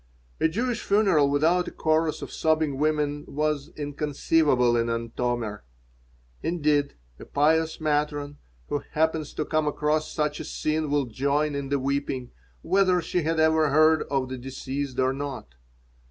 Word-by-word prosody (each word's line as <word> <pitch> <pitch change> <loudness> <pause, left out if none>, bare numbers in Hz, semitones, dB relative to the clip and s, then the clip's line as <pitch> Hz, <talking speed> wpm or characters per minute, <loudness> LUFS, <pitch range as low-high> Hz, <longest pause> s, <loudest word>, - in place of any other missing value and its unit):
A - - +4
Jewish 235 +7 -2
funeral 195 -9 +3
without 165 +5 +2
a - - -5
chorus 155 0 0
of - - -7
sobbing 155 -3 0
women 150 -1 0
was 150 0 -1
inconceivable 145 -3 +1
in 115 0 +1
Antomir. 115 -2 -2 0.8
Indeed, 150 -4 +1 0.2
a - - -9
pious 160 +2 +1
matron 145 -1 -1 0.3
who 145 - -1
happens 160 -1 0
to 155 - -2
come 155 -1 0
across 150 +1 0
such 150 -1 -1
a - - -4
scene 155 0 -2
will 145 -1 +1
join 140 +5 0
in 140 -1 -4
the 140 - +1
weeping, 135 -2 -2 0.3
whether 190 -2 +3
she 175 +1 -1
had 160 +1 0
ever 160 -1 +4
heard 155 +2 +5
of 135 -2 0
the 130 -1 -5
deceased 135 +1 -5
or 130 0 +2
not. 135 - -6
150 Hz, 150 wpm, -26 LUFS, 140-155 Hz, 0.8 s, heard